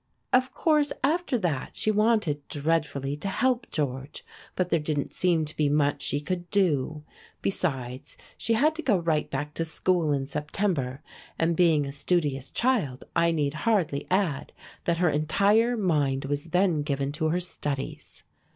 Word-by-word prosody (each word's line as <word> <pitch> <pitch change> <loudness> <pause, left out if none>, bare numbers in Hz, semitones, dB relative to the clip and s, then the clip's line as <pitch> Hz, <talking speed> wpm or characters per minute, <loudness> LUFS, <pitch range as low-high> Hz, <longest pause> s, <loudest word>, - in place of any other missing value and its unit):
Of 255 +1 +4
course 300 0 +2
after 310 -1 +1
that 165 - -2
she 215 - +2
wanted 210 -9 +1
dreadfully 145 -2 -1
to 195 - -4
help 250 +5 0
George, 135 -1 -3 0.3
but 185 -1 0
there 165 - +2
didn't 150 -2 -2
seem 170 -4 +2
to 150 - -8
be 150 -2 +2
much 145 -1 +1
she 145 - 0
could 175 +3 -4
do. 155 -6 +1 0.4
Besides, 135 -7 -2 0.2
she 230 - 0
had 295 +8 +3
to - - -2
go 240 -9 +3
right 165 -3 0
back 145 +2 -3
to 165 - -1
school 165 0 0
in 135 -2 0
September, 150 -2 -2 0.3
and 165 +1 +1
being 160 -4 +4
a 140 - -5
studious 145 -2 0
child, 200 - 0
I 170 - +4
need 150 -3 0
hardly 165 -5 0
add 185 -7 0 0.3
that 170 -1 +1
her 175 0 +3
entire 200 +11 +3
mind 145 -9 +1
was 145 +2 -2
then 180 -2 +2
given 140 -1 -1
to 155 +2 -1
her 175 +3 +1
studies. 145 -6 -5
160 Hz, 160 wpm, -27 LUFS, 145-190 Hz, 0.4 s, Of